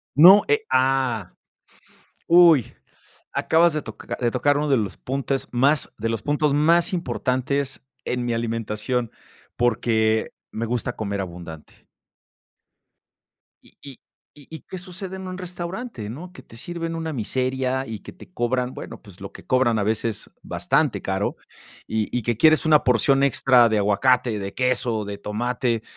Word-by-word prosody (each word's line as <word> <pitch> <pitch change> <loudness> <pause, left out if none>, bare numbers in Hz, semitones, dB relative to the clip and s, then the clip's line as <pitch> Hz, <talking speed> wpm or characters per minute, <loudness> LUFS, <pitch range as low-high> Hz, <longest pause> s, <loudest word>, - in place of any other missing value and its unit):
No, 185 +8 +9
eh, 435 0 +2
¡ah, 130 -6 +1 0.9
uy!, 170 -7 +5 0.6
acabas 170 0 +3
de 155 - -2
toca 110 -2 -7
de 120 -1 +1
tocar 145 +3 +2
uno 150 0 -1
de 135 - +4
los 105 -5 -2
puntes 135 0 -3
más 140 +4 +2
de 115 +1 -2
los 115 -2 -3
puntos 145 0 +1
más 170 +5 +3
importantes 140 -5 -2 0.2
en 125 -1 -2
mi 120 - -1
alimentación, 115 +1 -2 0.4
porque 110 -2 +1 0.2
me 115 +1 -3
gusta 120 0 -3
comer 100 -2 -3
abundante. 85 -4 -9 1.8
Y - - -23
y 135 -3 -11 0.4
y 145 -2 -16
y, 160 - -8
¿qué 185 - -8
sucede 185 +1 -7
en 190 - -7
un 185 0 -6
restaurante, 180 - -6
no? 175 +9 -9
Que 130 - -12
te 115 - -16
sirven 165 +2 -5
una 160 -1 -4
miseria, 130 +2 -1
y 110 -2 -6
que - - -11
te 180 - -16
cobran, 125 +1 -1
bueno, - - -9
pues 100 -3 -16
lo 100 - -7
que - - -13
cobran 130 -3 +2
a - - 0
veces, 110 0 -2
bastante - - 0
caro. - - -2 0.5
Y 110 -1 -1
y - - -1
que 120 0 0
quieres 155 +4 +5
una 155 -2 +5
porción 135 +3 +3
extra 125 -3 +4
de 110 - +1
aguacate, 105 +3 +2
de 100 0 -5
queso, 125 -4 0
de 100 0 -6
tomate 120 +2 -2
125 Hz, 155 wpm, -23 LUFS, 110-150 Hz, 1.8 s, No